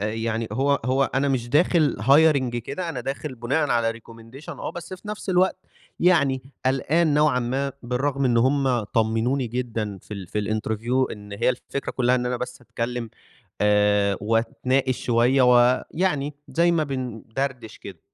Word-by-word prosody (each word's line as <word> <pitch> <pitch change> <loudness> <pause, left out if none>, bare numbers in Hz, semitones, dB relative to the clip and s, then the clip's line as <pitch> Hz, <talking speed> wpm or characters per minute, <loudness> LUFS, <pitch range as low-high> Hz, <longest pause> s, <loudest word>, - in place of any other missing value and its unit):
آآ، 105 - -1
يعني 115 0 -2
هو 140 +5 +1
هو 130 +2 +2
أنا 135 +2 +2
مش 125 -3 -1
داخل 155 +1 +3
hiring 140 -4 +4
كده 140 +9 -5
أنا 135 -6 -4
داخل 135 +2 -5
بناءًا 135 +6 0
على 115 -1 +1
recommendation 115 +4 -14
آه، - - -5
بس 175 +2 -7
في 185 +3 -13
نفس 210 -2 -4
الوقت 185 +1 +1 0.4
يعني 140 -7 +3 0.2
قلقان 150 +4 +2
نوعًا 150 -3 +3
ما 135 +3 -2
بالرغم 135 +3 -1
إن 120 -2 +2
هم 130 -1 +2
طمِّنوني 115 +5 0
جدًا 110 -4 -3
في 105 - -8
ال 95 -2 -7
في 105 - -2
الinterview 110 +4 -1
إن 105 -1 -10
هي 100 - +1
الفكرة 130 +2 -5
كلّها 125 0 +2
إن 125 -1 0
أنا 125 0 -1
بس 125 +1 -6
أتكلّم 115 0 -4 0.5
آآ، 105 -1 +3
وأتناقش 120 +4 0
شوية 125 +3 +3
ويعني 135 +5 +2
زي 170 +1 +2
ما 160 -2 +1
بنْدرْدِش 130 -2 -5
كده. - - -11
125 Hz, 160 wpm, -24 LUFS, 115-140 Hz, 0.5 s, hiring